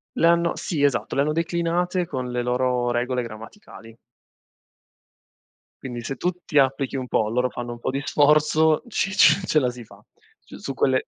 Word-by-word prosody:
Le 165 - +3
hanno 170 0 +2
sì 155 -5 -2
esatto, 140 -4 0
le 140 - +2
hanno 150 - +1
declinate 170 +2 -1
con 130 -5 -5
le 125 0 -1
loro 125 0 0
regole 125 +1 -1
grammaticali. 115 - -12 1.9
Quindi, 120 -2 -6
se 135 +4 -4
tu 175 - -1 0.2
ti 150 - +2
applichi 135 0 +1
un 130 -1 -4
po', 110 -3 +1
loro 125 +2 0
fanno 120 -1 -6
un 120 - -8
po' - - -3
di 135 +1 -2
sforzo, 155 +1 +3
ci 195 -3 -1
ce 200 - +6
ce 155 - +3
la 125 -3 0
si 120 -1 -10
fa - - -17 0.5
c - - -12
su 135 - -6
quelle 130 0 +1
130 Hz, 185 wpm, -23 LUFS, 125-155 Hz, 1.9 s, ce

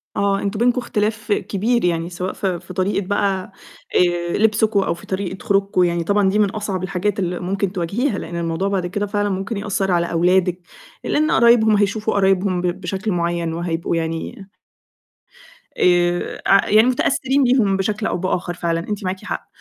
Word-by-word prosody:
آه، 200 0 +1
أنتم 205 +2 -3
بينكم 245 +1 +3
اختلاف 220 -1 -2
كبير 215 +3 0
يعني 170 -1 0
سواء 180 +1 -4
في 185 -3 -2
في 185 - -11
طريقة 190 +1 -1
بقى 195 -2 -1 0.4
آآ، 175 -1 +1
لبسكم 215 -1 +2
أو 190 - 0
في 170 - -13
طريقة 190 -1 -4
خروجكم 195 -2 +2
يعني 170 -1 0
طبعًا 200 +1 +2
دي 210 - +1
من 205 -2 +3
أصعب 200 -3 -3
الحاجات 195 +2 -1
اللي 180 -1 -2
ممكن 195 +1 -2
تواجهيها، 200 - -1
لإن 170 - -7
الموضوع 170 +3 -1
بعد 190 -3 -1
كده 205 +3 -2
فعلًا 205 0 -1
ممكن 195 +3 -3
يأثّر 200 -2 -1
على 170 -1 +1
أولادِك، 180 +1 +2 0.4
لإن 305 +1 +1
قرايبهم 230 -2 +5
هيشوفوا 210 +2 0
قرايبهم 190 -2 +2
ب - - -3 0.2
بشكل 195 +4 -3
معيّن 170 -2 -1
وهيبقوا 170 0 -2
يعني 165 +4 -4 1.3
آآ، 175 -1 +1
أع 195 0 +4
يعني 215 +3 +5
متأثّرين 265 +2 +1
بيهم 240 -6 +3
بشكل 210 +2 -2
أو - - -1
بآخَر، 180 -1 -2
فعلًا 170 -1 -1
أنتِ 205 +4 -5
معاكِ 185 +1 -4
حق، - - -5
195 Hz, 170 wpm, -20 LUFS, 175-210 Hz, 1.3 s, قرايبهم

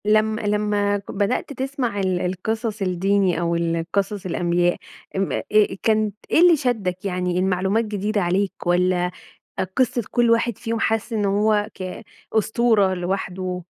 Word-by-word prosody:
لم 215 +1 +3
لمّا 205 -1 +1
ك 200 - -9
بدأت 205 +7 -1
تسمَع 260 -5 -2
ال 185 -2 0
القِصَص 215 +4 -2
الديني 190 0 +1
أو 170 0 0
ال 165 -1 -1
قِصَص 200 0 -1
الأنبياء 175 0 +1 0.4
أم 195 0 0
آآ، - - -2 0.4
كانت 215 -2 +2 0.2
إيه - - +4
اللي 350 -1 +7
شدّك 205 -9 -2
يعني 180 -1 -1
المعلومات 190 +4 +1
جديدة 210 0 -1
عليك 190 +2 0
والّا 180 0 +2 0.7
قِصّة 250 -2 +2
كلّ 240 -1 +3
واحد 230 -1 +2
فيهم 230 -1 -3
حاسس 225 0 0
إن 210 -2 0
هو 205 +1 +2
ك 185 +3 -6 0.3
أسطورة 220 -2 +3
لوحده 185 0 -3
200 Hz, 145 wpm, -22 LUFS, 180-220 Hz, 0.7 s, اللي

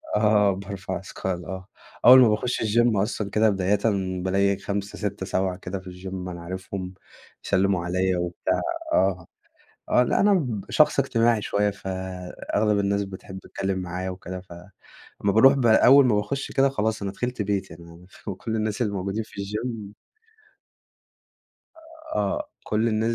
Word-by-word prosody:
آه 105 -1 +4
بارفع 95 -1 -5
أثقال 95 -1 -5
آه، 95 +2 -7 0.4
أول 130 +1 +10
ما 125 -3 +6
باخش 120 +4 -1
الجيم 115 0 +2
أصلًا، 100 0 -1
كده 110 +2 +3
بدايةً 95 0 +1 0.4
بالاقي 100 +1 +2
5، 100 0 -4
6، 100 -2 -3
7، 95 -1 -1
كده 95 +1 -5
في 95 - -15
الجيم 90 0 -6
أنا 85 -1 -7
عارفهم 95 +1 -6 0.5
يسلموا 95 -2 +1
عليَّ 90 +1 +1
وبتاع. 90 0 -1 0.3
آه، 90 -3 +1 0.6
آه، 125 - +4
لا 125 - +1
أنا 205 0 +5
ب 120 - -1
شخص 150 -2 +4
اجتماعي 115 -4 +2
شوية، 105 0 +1
فأغلب 95 +2 -2
الناس 100 0 +1
بتحب 95 0 -9
تتكلم 95 0 -3
معايا 90 +1 -4
وكده، 90 0 -7
ف 90 -1 -15 0.7
امّا 100 - +3
باروح 130 +7 +7
بقى 120 -5 +4
أول 135 +1 +8
ما 110 - +3
باخش 105 +7 -2
كده 135 0 +4
خلاص، 110 -4 -1
أنا 100 - -2
دخلت 125 -1 -3
بيتي، 95 -4 -2
أنا 85 +1 -14 0.3
كل 110 +2 -3
الناس 110 +1 -1
الموجودين 100 0 -2
في 105 - -9
الجيم 105 +1 -5 2.2
آه، 305 -1 -1 0.2
كل 110 +2 +1
الناس 110 +1 0
100 Hz, 150 wpm, -25 LUFS, 95-110 Hz, 2.2 s, أول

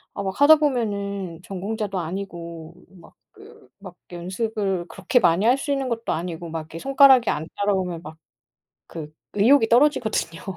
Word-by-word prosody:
아, 200 - -4
막 190 0 -5
하다 310 +2 +9
보면은 200 - -2
전공자도 200 0 -4
아니고 170 -2 -7 0.3
막 - - -18 0.2
그 430 +1 -17
막 185 -3 -11 0.2
연습을 190 +1 -3
그렇게 195 +6 +1
많이 180 +2 +2
할 250 +3 +4
수 285 +1 -4
있는 270 -2 -1
것도 230 -1 -3
아니고 170 0 -5
막 165 0 -4
이렇게 160 +1 -10
손가락이 270 -2 +5
안 155 +2 -2
따라오면 190 -4 -1
막 155 +1 -10 0.7
그 155 -2 -9 0.2
의욕이 225 +3 +4
떨어지거든요. 235 - +1
200 Hz, 330 characters per minute, -23 LUFS, 170-240 Hz, 0.7 s, 하다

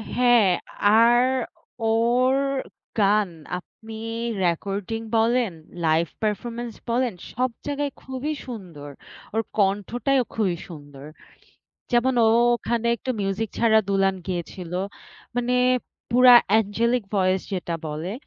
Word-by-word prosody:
হ্যাঁ, 245 -4 +5 0.6
আর 240 +1 +5 0.7
ওর 240 +3 +3 0.6
গান 205 -1 +3 0.3
আপনি 220 +4 -12 0.5
রেকর্ডিং 200 +5 -2 0.2
বলেন, 230 -3 +2 0.3
লাইভ 160 +1 +2 0.2
পারফরম্যান্স 230 +3 -3 0.2
বলেন 240 -1 +1 0.2
সব 255 +2 0 0.2
জায়গায় 285 0 -2
খুবই 265 +4 -4
সুন্দর, 180 - -8 0.4
ওর 225 - +1 0.2
কণ্ঠটাই 205 +6 +1
অ - - -20
খুবই 190 -6 0
সুন্দর। 145 -4 -11 0.9
যেমন 250 +2 +3
ও - - +5 0.3
ওখানে 235 0 -2
একটু 255 - -5
মিউজিক 195 +2 -1
ছাড়া 220 -2 +5
দুলাইন 195 -1 +2
গিয়েছিল, 180 -1 -5 0.6
মানে 245 0 0 0.6
পুরা 250 0 +8 0.2
অ্যাঞ্জেলিক 225 +3 +2
ভয়েস 185 0 +2
যেটা 175 -3 -2
বলে। 155 +5 -4
220 Hz, 110 wpm, -24 LUFS, 190-240 Hz, 0.9 s, পুরা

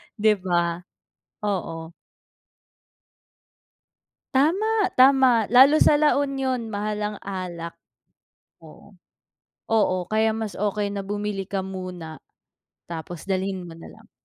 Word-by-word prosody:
'di 210 -2 +2
ba, 175 -2 0 0.6
oo. 170 -5 -3 2.4
Tama, 390 +8 +2
tama. 260 -5 +5
Lalo 265 +7 +6
sa 295 - +5
La 295 -1 +3
Union 265 -4 -2
mahal 210 0 -3
ang 210 0 -3
alak. 180 -4 -6 0.9
Oo, 160 +5 -16 0.8
oo, 210 -4 +3
kaya 220 +1 +2
mas 220 -2 -4
okey 205 0 -1
na 200 - -3
bumili 205 -1 -3
ka 195 -1 -2
muna, 180 -4 -7 0.7
tapos 170 +1 -7
dalhin 190 -1 -2
mo 165 - -10
na 165 - -11
lang. - - -20
205 Hz, 110 wpm, -24 LUFS, 185-245 Hz, 2.4 s, Lalo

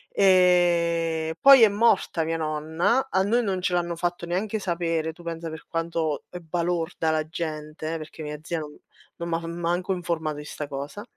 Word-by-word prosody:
Ehm, 170 -3 +3
poi 275 -3 +9
è 220 - +9
morta 200 -5 +2
mia 165 +1 -1
nonna, 160 - 0
a 190 0 +2
noi 235 +4 +2
non 190 -3 -1
ce 180 - 0
l'hanno 175 -1 0
fatto 175 0 -2
neanche 205 +5 -1
sapere, 165 -3 -1
tu 175 +1 -15
pensa 165 -1 -5
per 160 0 -9
quanto 165 -2 -2
è 180 - -7
balorda 170 -1 -1
la 155 0 0
gente, 155 0 -4
perché 155 0 -9
mia 150 0 -5
zia 165 0 -2
non 150 -1 -8 0.4
non 170 0 -5
m'ha 165 0 -2
manco 175 +2 -2
informato 160 -4 -2
di 150 - -8
'sta 150 -1 -6
cosa. 140 +10 -6
170 Hz, 175 wpm, -25 LUFS, 160-180 Hz, 0.4 s, poi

